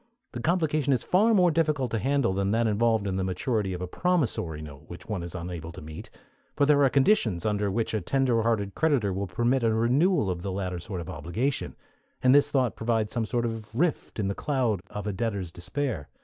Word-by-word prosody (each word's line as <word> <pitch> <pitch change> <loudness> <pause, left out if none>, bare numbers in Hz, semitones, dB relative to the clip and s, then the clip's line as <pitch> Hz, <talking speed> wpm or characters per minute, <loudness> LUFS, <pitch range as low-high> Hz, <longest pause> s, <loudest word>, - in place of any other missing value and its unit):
The 120 - -6
complication 155 -2 +1
is 125 - 0
far 210 +6 +3
more 180 -3 +5
difficult 150 -6 +1
to 115 - 0
handle 135 -3 +1
than 100 +1 0
that 115 +3 +2
involved 110 0 +2
in 95 -1 -1
the 95 - 0
maturity 95 +2 -1
of 90 0 -4
a - - -3
promissory 125 - 0
note 75 -1 -10
which 85 - -10
one 105 -5 -3
is 85 +1 -7
unable 85 -2 -6
to 90 - -9
meet; 80 -1 -9 0.5
for 145 - +3
there 145 -1 +4
are 135 - +5
conditions 125 - +2
under 105 -1 0
which 115 +4 -1
a 110 - 0
tender 125 +2 +1
hearted 110 -3 0
creditor 140 -11 +1
will 100 +1 -3
permit 120 +8 +1
a 115 -1 +2
renewal 125 - +2
of 85 -1 -4
the 95 - -3
latter 95 -2 -3
sort 90 +1 -5
of 80 - -8
obligation, 120 +11 -2 0.5
and 130 0 +6
this 145 0 +5
thought 130 -5 +1
provides 110 -2 -1
some 115 -2 -1
sort 120 +1 0
of 110 -1 -5
rift 160 +4 -1
in 105 -3 -1
the 100 - 0
cloud 125 -7 0
of 105 - -6
a 105 - -2
debtor's 100 -5 -2
despair. 95 - -4
110 Hz, 220 wpm, -27 LUFS, 95-135 Hz, 0.5 s, and